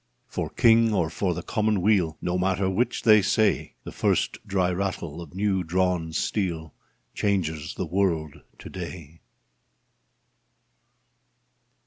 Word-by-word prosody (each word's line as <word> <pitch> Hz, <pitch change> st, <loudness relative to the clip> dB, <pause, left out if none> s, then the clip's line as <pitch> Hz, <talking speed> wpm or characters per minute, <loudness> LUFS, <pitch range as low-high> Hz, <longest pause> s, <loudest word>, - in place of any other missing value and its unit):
For -, -, -4 dB
King 115 Hz, -2 st, +4 dB
or 85 Hz, -4 st, 0 dB
for 90 Hz, 0 st, -1 dB
the -, -, -5 dB
Commonweal 105 Hz, -6 st, +1 dB
No 90 Hz, -, -1 dB
matter 95 Hz, +1 st, +1 dB
which 120 Hz, +7 st, -1 dB
they 110 Hz, -2 st, +7 dB
say, 105 Hz, +2 st, +1 dB
The -, -, -8 dB
first -, -, 0 dB
dry 95 Hz, -2 st, +1 dB
rattle 90 Hz, -4 st, -3 dB
of 85 Hz, 0 st, -11 dB
new 95 Hz, -1 st, 0 dB
drawn 90 Hz, -1 st, 0 dB
steel 80 Hz, -3 st, -2 dB, 0.4 s
Changes 80 Hz, -6 st, -1 dB
the -, -, -3 dB
world 85 Hz, -4 st, -1 dB, 0.2 s
to -, -, -11 dB
day 85 Hz, -3 st, -8 dB
90 Hz, 120 wpm, -25 LUFS, 85-100 Hz, 0.4 s, they